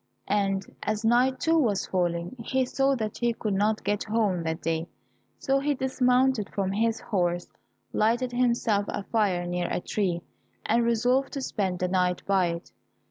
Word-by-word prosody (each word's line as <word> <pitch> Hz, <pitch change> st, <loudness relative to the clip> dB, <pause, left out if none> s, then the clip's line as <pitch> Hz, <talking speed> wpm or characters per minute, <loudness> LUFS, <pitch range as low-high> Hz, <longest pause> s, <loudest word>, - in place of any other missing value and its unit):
And 195 Hz, -1 st, +1 dB, 0.2 s
as 215 Hz, +1 st, -2 dB
night, 250 Hz, +3 st, +3 dB
too, 325 Hz, 0 st, +3 dB
was 210 Hz, -9 st, +1 dB
falling, 175 Hz, +2 st, -1 dB
he 260 Hz, +3 st, 0 dB
saw 270 Hz, +2 st, +1 dB
that 220 Hz, -4 st, -4 dB
he 240 Hz, -1 st, +1 dB
could 215 Hz, -2 st, -2 dB
not 210 Hz, +2 st, +1 dB
get 205 Hz, +1 st, -1 dB
home 210 Hz, -5 st, +1 dB
that 160 Hz, 0 st, -2 dB
day, 165 Hz, 0 st, -1 dB, 0.5 s
so 275 Hz, 0 st, +1 dB
he 290 Hz, +1 st, 0 dB
dismounted 255 Hz, -3 st, +2 dB
from 195 Hz, -1 st, -1 dB
his 225 Hz, +3 st, +1 dB
horse, 175 Hz, -4 st, -1 dB, 0.4 s
lighted 240 Hz, +4 st, +1 dB
himself 235 Hz, -4 st, +1 dB
a -, -, -3 dB
fire 195 Hz, -5 st, 0 dB
near 175 Hz, 0 st, -1 dB
a -, -, -1 dB
tree, 175 Hz, -3 st, -1 dB, 0.4 s
and 235 Hz, +2 st, +2 dB
resolved 245 Hz, +4 st, +1 dB
to 275 Hz, -, -3 dB
spend 190 Hz, -7 st, -1 dB
the 180 Hz, -, 0 dB
night 180 Hz, -1 st, +1 dB
by 190 Hz, -2 st, +3 dB
it. 170 Hz, +1 st, -5 dB
215 Hz, 170 wpm, -27 LUFS, 185-245 Hz, 0.5 s, night